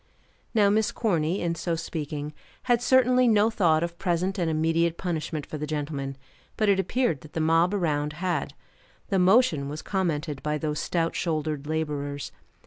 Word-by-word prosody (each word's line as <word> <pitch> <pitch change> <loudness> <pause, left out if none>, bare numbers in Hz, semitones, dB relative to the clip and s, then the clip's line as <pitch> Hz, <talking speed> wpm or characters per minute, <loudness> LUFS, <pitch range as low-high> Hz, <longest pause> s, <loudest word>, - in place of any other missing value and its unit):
Now 205 -2 +5
Miss 220 +2 +2
Corny, 180 -7 0
in 170 -1 0
so 170 +1 -2
speaking, 150 -2 -5 0.3
had 240 -2 +2
certainly 255 0 +4
no 215 0 +4
thought 165 -6 +3
of 170 0 -5
present 185 +2 0
and 170 -2 +1
immediate 165 +1 +1
punishment 160 -4 -3
for 155 - -7
the 150 - -3
gentleman; 145 -3 -3 0.4
but 215 -2 +2
it 195 -1 +4
appeared 195 - 0
that 150 - -14
the - - -2
mob 165 +3 +3
around 150 -6 0
had. 165 -4 -2 0.5
The 195 - +2
motion 180 - +4
was 150 +2 -6
commented 155 -7 -2
by 150 0 -1
those 150 0 -2
stout 165 -1 -1
shouldered 155 -3 -2
laborers. 145 -2 -3
165 Hz, 165 wpm, -26 LUFS, 150-190 Hz, 0.5 s, Now